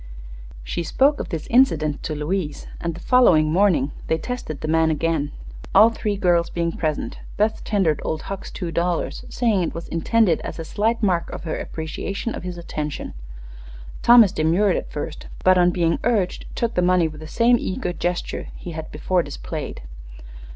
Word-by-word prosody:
She - - -3
spoke 275 - +2
of - - -4
this 165 -4 -4
incident 160 - +3
to 155 - -3
Louise, 150 +1 -3
and 170 -1 -3
the - - -9
following 170 -10 +4
morning 175 -6 +3 0.2
they 160 - +1
tested 165 - -5
the - - -3
man 160 0 +3
again. 155 -1 0 0.4
All 215 +4 +8
three 210 -2 -2
girls 175 -3 +2
being 170 -1 -1
present, 155 -2 -3 0.2
Beth 215 +1 +1
tendered 185 -8 +1
Old 155 0 -3
Hucks 195 -1 -6
two 175 -3 -5
dollars, 170 0 -1
saying 225 -6 +1
it 170 - -2
was 165 - -6
intended 180 +1 +2
as - - -6
a 165 - -5
slight 220 +5 0
mark 175 -4 +1
of - - -7
her 160 - -3
appreciation 195 +7 -4
of - - -5
his 180 -1 -6
attention. 150 -3 -5 0.9
Thomas 235 -5 +7
demurred 180 +3 +2
at - - -4
first, 150 +1 -6 0.2
but 185 0 +5
on 175 0 +5
being 170 -2 +1
urged 215 -6 0
took 235 -1 -1
the 180 - +1
money 180 -2 +3
with 155 0 -9
the 155 - -8
same 235 +7 +3
eager 180 -1 -3
gesture 175 0 -3
he 175 - -8
had 160 -1 -7
before 180 +4 +1
displayed. - - -6
175 Hz, 180 wpm, -22 LUFS, 160-205 Hz, 0.9 s, All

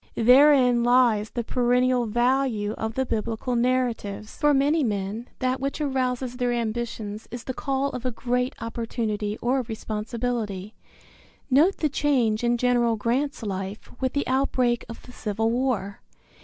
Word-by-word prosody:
Therein 250 0 +6
lies 240 -3 +3
the 240 - -3
perennial 250 0 +2
value 240 -2 +1
of 220 +1 -4
the 265 - 0
Biblical 230 +2 -2
narratives. 235 -4 -1
For 295 - +3
many 290 +3 +3
men 210 +1 -2
that 255 +1 -1
which 275 +3 -3
arouses 255 -3 -1
their 245 -1 0
ambitions 225 -2 -3
is 240 +1 -7
the 260 - -4
call 275 +1 -1
of 250 - -6
a 255 - 0
great 250 +2 -1
opportunity 225 -2 -3
or 260 +2 +2
responsibility. 220 -2 -4 0.8
Note 315 +9 +4
the 310 - +1
change 255 -6 +1
in 240 0 +2
General 240 -1 +2
Grant's 245 +5 -1
life 195 0 -5
with 260 -1 0
the 285 - 0
outbreak 255 -2 +1
of 230 - -9
the 250 - -13
Civil 225 -1 -1
War. 235 -5 -1
240 Hz, 145 wpm, -25 LUFS, 220-255 Hz, 0.8 s, Therein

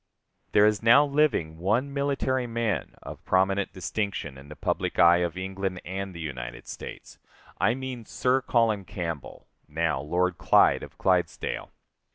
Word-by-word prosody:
There 105 - +6
is 105 -2 +2
now 125 +6 +6
living 140 - +1
one 115 +10 0
military 135 -3 0
man 115 -3 -2
of - - -9
prominent 95 +1 +1
distinction 95 -6 -3
in 70 +2 -13
the 75 - -9
public - - -2
eye 85 0 +7
of 90 -1 -2
England 95 0 -3
and 95 +2 -4
the - - -7
United 65 -6 -6
States - - -9 0.4
I 120 - +3
mean 130 -3 -6
Sir 130 +1 +1
Colin 115 -5 +1
Campbell, 85 -5 -6 0.2
now 80 -3 -1
Lord 90 +4 0
Clyde - - +4
of - - -11
Clydesdale. 90 -3 0
95 Hz, 150 wpm, -27 LUFS, 85-115 Hz, 0.4 s, eye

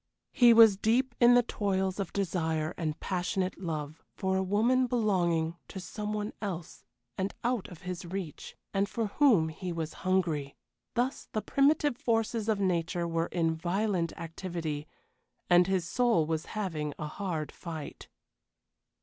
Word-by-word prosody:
He 240 -2 +6
was 225 -3 +8
deep 240 +5 +2
in 240 0 +7
the 245 - +6
toils 190 -3 -1
of 195 - -3
desire 160 -4 -1
and 155 -2 -3
passionate 185 0 -2
love 155 -3 -4
for 190 0 0
a 190 - +2
woman 230 +7 +2
belonging 175 -8 +1
to 190 - -7
someone 210 +2 -4
else 180 -6 -5 0.4
and 190 +1 -2
out 240 -4 0
of 175 - -12
his 180 0 -5
reach, 175 -3 -6 0.2
and 200 0 +1
for 230 +3 -1
whom 205 - +4
he 175 +3 -5
was 165 -2 -4
hungry. 165 -7 0 0.4
Thus 245 +3 -1
the 215 - 0
primitive 290 -1 +2
forces 225 -1 0
of 215 -2 +2
nature 175 -2 0
were 165 0 0
in 165 -2 0
violent 180 0 0
activity, 165 -3 -4 0.6
and 175 0 +6
his 185 -4 0
soul 235 -7 +2
was 160 0 -2
having 155 -8 -2
a 150 - -4
hard 160 -1 -4
fight. 160 -4 -8
185 Hz, 150 wpm, -30 LUFS, 165-215 Hz, 0.6 s, was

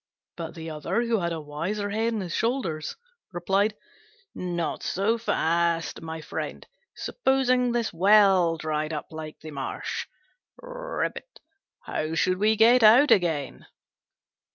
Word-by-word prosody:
But 165 -2 -7
the 160 -1 -7
other, 155 +10 -1
who 230 -2 +1
had 170 -1 -1
a 165 - -3
wiser 170 +8 -3
head 225 +2 0
on 215 - -2
his 175 -3 -5
shoulders, 225 - -1 0.4
replied, 195 +4 +1 0.6
"Not 175 -3 -3
so 215 +5 0
fast, 170 -5 0
my 160 0 -6
friend: - - -6 0.3
supposing 255 - +1
this 235 -4 -1
well 190 -2 +5
dried 155 0 -2
up 150 - -6
like 155 -1 -8
the 155 - -8
marsh, 135 -2 -4 1.8
how 155 +1 -3
should 185 +3 +1
we 215 +2 +3
get 235 +3 +6
out 235 +7 +7
again?" 160 -7 +1
180 Hz, 130 wpm, -26 LUFS, 160-220 Hz, 1.8 s, out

